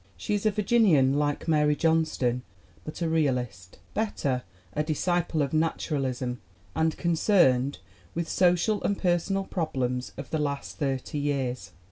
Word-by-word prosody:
She 90 - -3
is 205 +1 +1
a - - +6
Vir 210 0 -2
ginian, 185 - +4
like 145 +2 -1
Mary 150 -2 +3
Johnston, 155 -7 +1 0.4
but 155 - -5
a - - +1
realist 125 - -1 0.2
bet 220 0 -1
ter, 130 -3 0 0.3
a 150 - 0
disciple 160 0 0
of 140 - -3
naturalism 135 -6 -1 0.3
and 160 0 +1
concerned 160 - +3 0.4
with 170 0 -2
social 180 +5 +2
and 200 - 0
personal 185 +2 +1
problems 130 -9 -2
of 140 -2 -8
the 160 - 0
last 140 -1 -3
thirty 135 0 -2
years. 130 -8 -2
150 Hz, 145 wpm, -27 LUFS, 130-175 Hz, 0.4 s, a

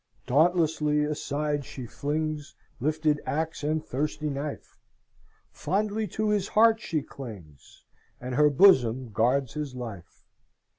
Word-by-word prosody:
"Dauntlessly 155 0 +2
aside 150 -1 -2
she 130 -1 -8
flings 150 +3 -3 0.2
Lifted 150 +2 +1
axe 160 +1 -3
and 155 +1 -1
thirsty 150 +2 -2
knife; 140 +1 -6 0.8
Fondly 210 +2 -1
to 215 +4 -1
his 205 -2 +1
heart 225 +1 +4
she 155 -9 -2
clings, 95 - -11 0.4
And 125 +1 -5
her 150 +3 +5
bosom 130 - +4
guards 125 +3 +1
his 150 -4 -5
life! 110 -8 -8
150 Hz, 115 wpm, -27 LUFS, 130-160 Hz, 0.8 s, her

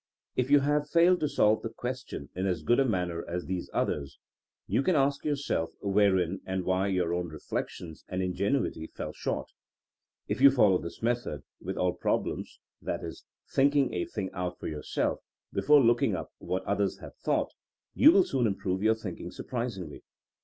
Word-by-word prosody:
If 125 +1 0
you 145 0 +6
have 145 +1 +1
failed 175 +2 +5
to 150 - 0
solve 110 -6 +3
the 115 - -4
question 125 - -6
in 95 +2 -1
as 90 -4 -1
good 120 - +3
a 135 - +4
manner 90 -7 -1
as 90 +1 -3
these 90 -1 -3
others, 70 -2 -2 0.5
you - - +1
can 180 +5 +2
ask 140 0 +2
yourself 140 - -1
wherein 95 -3 +2
and 95 0 -2
why 95 +1 +1
your 90 -3 0
own 90 0 -1
reflections 80 +1 -5
and 90 - -3
ingenuity 95 - -1
fell - - -6
short. - - -3 0.8
If - - -2
you 140 - +10
follow 105 -9 +4
this 85 - -8
method 115 - -1 0.2
with - - -4
all 90 -1 +1
prob - - 0
lems - - -4 0.2
— - - -31
i.e., - - -2 0.4
thinking 140 0 +3
a 90 - -1
thing 95 -3 -4
out 90 -1 -3
for - - -9
yourself 75 -2 -2 0.3
be - - 0
fore 145 -1 +6
looking 120 0 +3
up - - -6
what 95 - -2
others 100 -1 0
have - - -11
thought - - 0 0.3
— - - -52
^you 305 - +8
will 195 - +6
soon 130 -7 +1
improve 95 -2 -2
your 110 +1 +4
thinking 95 -5 -6
surprisingly. 105 - -5
100 Hz, 185 wpm, -29 LUFS, 90-135 Hz, 0.8 s, you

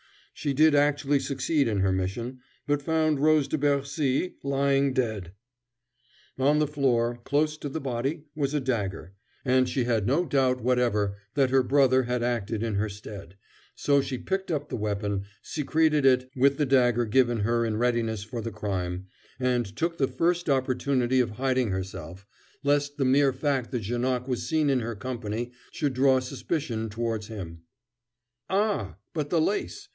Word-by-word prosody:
She 145 -3 -2
did 155 +2 +5
actually 145 -1 +3
succeed 140 +1 0
in 105 -4 0
her 95 0 +2
mission, 95 +7 -3 0.3
but 145 0 +1
found 155 -1 +1
Rose 155 -1 +4
de 155 - -1
Bercy 140 +2 0
lying 140 0 +2
dead. 110 -9 -2 1.1
On 145 +3 +4
the 150 - +3
floor, 120 -5 +1
close 150 +3 +1
to 145 - -5
the 160 - -4
body, 135 +4 -2
was 145 -1 -1
a - - +2
dagger, 100 - -3 0.3
and 130 0 +3
she 130 - 0
had 115 -4 0
no 155 +8 +2
doubt 130 -3 +2
whatever 110 -5 +1 0.2
that 135 -3 +3
her 135 0 +5
brother 130 0 +4
had 125 0 -1
acted 115 -2 -1
in 115 -2 -1
her 105 +2 0
stead, 100 -2 -10 0.4
so 140 -1 +3
she 135 -1 -4
picked 190 +7 -3
up 150 -3 -2
the - - -3
weapon, 100 -2 -2 0.2
secreted 155 0 +1
it 130 0 +3
with 135 +2 +3
the 150 - +2
dagger 120 -3 +3
given 120 0 +2
her 115 +2 +1
in 110 -2 -1
readiness 115 -3 0
for 115 +2 -5
the 115 - -4
crime, 95 -4 -3 0.3
and 120 -5 0
took 170 0 -1
the 135 - +3
first 175 +2 0
opportunity 130 -1 +1
of 120 -3 +1
hiding 130 +1 0
herself, 95 -1 -5 0.4
lest 145 0 +1
the 135 - +1
mere 135 +1 +4
fact 135 -2 -1
that 120 -4 -3
Janoc 125 +3 -1
was 125 -2 -2
seen 155 -3 +2
in 130 - +2
her 115 -1 -4
company 120 +1 -4 0.2
should 145 -4 -1
draw 130 0 +4
suspicion 130 -3 -3
towards 110 0 -3
him. 85 -7 -8 0.9
"Ah, 190 - 0 0.2
but 150 -3 -2
the 165 - +2
lace? 210 - -1
130 Hz, 170 wpm, -27 LUFS, 115-145 Hz, 1.1 s, did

